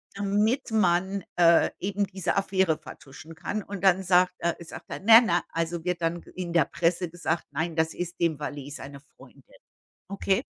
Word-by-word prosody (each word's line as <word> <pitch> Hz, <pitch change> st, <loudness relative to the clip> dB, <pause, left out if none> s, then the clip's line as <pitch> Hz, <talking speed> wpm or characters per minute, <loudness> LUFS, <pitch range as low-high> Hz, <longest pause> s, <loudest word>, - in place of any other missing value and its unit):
damit 210 Hz, +6 st, 0 dB
man, 190 Hz, -2 st, +1 dB
äh, 170 Hz, -1 st, +5 dB
eben 200 Hz, +1 st, -1 dB
diese 190 Hz, -2 st, -2 dB
Affäre 190 Hz, -4 st, +1 dB
vertuschen 155 Hz, +1 st, -12 dB
kann 205 Hz, +5 st, -4 dB
und 200 Hz, -1 st, -8 dB
dann 190 Hz, 0 st, +4 dB
sagt 180 Hz, 0 st, +3 dB
er 170 Hz, -, 0 dB
sagt -, -, -11 dB
er, -, -, -5 dB
ne 225 Hz, +4 st, +8 dB
nei 175 Hz, -5 st, +2 dB
also 165 Hz, 0 st, -3 dB
wird 180 Hz, -1 st, -2 dB
dann 165 Hz, +1 st, -1 dB
ge -, -, -17 dB
in 180 Hz, -2 st, -5 dB
der 170 Hz, -4 st, +4 dB
Presse 175 Hz, +2 st, -1 dB
gesagt, 170 Hz, 0 st, -2 dB
nein, 160 Hz, +3 st, -3 dB
das 160 Hz, 0 st, 0 dB
ist 175 Hz, 0 st, -6 dB
dem 165 Hz, -4 st, 0 dB
Valet 145 Hz, -1 st, -6 dB
seine 140 Hz, 0 st, -9 dB
Freundin, -, -, -19 dB, 0.7 s
okay? 200 Hz, +3 st, 0 dB
175 Hz, 180 wpm, -26 LUFS, 165-195 Hz, 0.7 s, ne